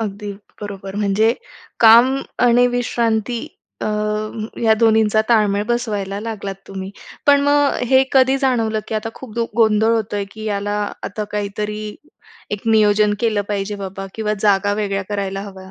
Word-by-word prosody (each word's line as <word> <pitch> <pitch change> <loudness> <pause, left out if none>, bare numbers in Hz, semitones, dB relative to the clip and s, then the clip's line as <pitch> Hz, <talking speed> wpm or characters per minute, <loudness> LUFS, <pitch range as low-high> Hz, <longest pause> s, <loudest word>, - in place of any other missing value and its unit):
अगदी 205 -1 -4 0.3
बरोबर. 195 -1 -7
म्हणजे 210 +2 +2 0.5
काम 235 +4 +7 0.3
आणि 245 +1 +5
विश्रांती 235 -1 -1 0.4
अ, - - -1 0.8
या 220 -1 +5
दोन्हींचा 220 -1 +4
ताळमेळ 210 -3 +3
बसवायला 205 -5 -2
लागलात 210 -3 -5
तुम्ही. 190 0 -6 0.4
पण 285 0 +6
मग 290 0 +3 0.2
हे 260 0 +6
कधी 265 0 +4
जाणवलं, 225 -5 +1
की 220 - -3
आता 215 +1 -2
खूप 250 -5 -11
दु 235 -1 0
गोंधळ 220 0 +4
होतोय 205 -2 -2
की 220 0 -9
याला 205 -1 -2 0.3
आता 210 +1 -4
काहीतरी 210 +1 -3 0.7
एक 205 -1 -3
नियोजन 210 -1 +4
केलं 215 -3 +1
पाहिजे 205 0 -2
बाबा 195 0 -6
किंवा 215 -1 -1
जागा 205 -1 +2
वेगळ्या 200 -2 -2
करायला 195 -1 -3
हव्या? 190 -2 -10
215 Hz, 145 wpm, -19 LUFS, 200-230 Hz, 0.8 s, काम